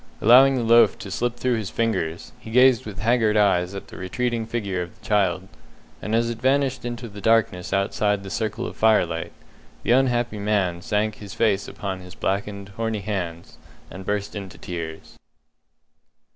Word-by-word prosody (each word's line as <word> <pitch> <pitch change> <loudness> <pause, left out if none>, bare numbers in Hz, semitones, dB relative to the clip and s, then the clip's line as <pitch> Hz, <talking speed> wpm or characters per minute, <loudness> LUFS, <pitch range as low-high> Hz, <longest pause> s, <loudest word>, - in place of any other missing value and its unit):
Allowing 130 +4 +7
the 125 - -1
loaf 115 +1 +5
to 100 - -8
slip 120 +4 -1
through 125 -1 0
his 105 -3 -4
fingers, 95 -8 -2
he - - -11
gazed 125 -1 +4
with 100 -2 -8
haggard 115 -2 +2
eyes 95 -2 +2
at 100 - -8
the - - -11
retreating 115 +4 -2
figure 100 -6 -2
of 90 +4 -8
the 110 - -20
child, 95 -3 +1 0.5
and 110 - -1
as 115 +1 +2
it 115 -1 -7
vanished 130 -1 +1
into 120 0 -5
the 105 -1 -10
darkness 110 -6 +2
outside 100 +1 0
the 95 - -8
circle 110 -2 -2
of - - -6
firelight, 90 -7 +2 0.5
the - - +1
unhappy 120 -4 +2
man 100 -4 0
sank 105 +3 -1
his 100 -2 -9
face 105 -4 +1
upon 95 -2 -5
his 90 0 -12
blackened, 100 +1 -3
horny 110 +1 -3
hands, 90 -5 -5 0.3
and 95 +2 -8
burst 105 +1 -3
into 100 -2 -7
tears. 80 -2 -7
105 Hz, 170 wpm, -23 LUFS, 95-115 Hz, 0.5 s, Allowing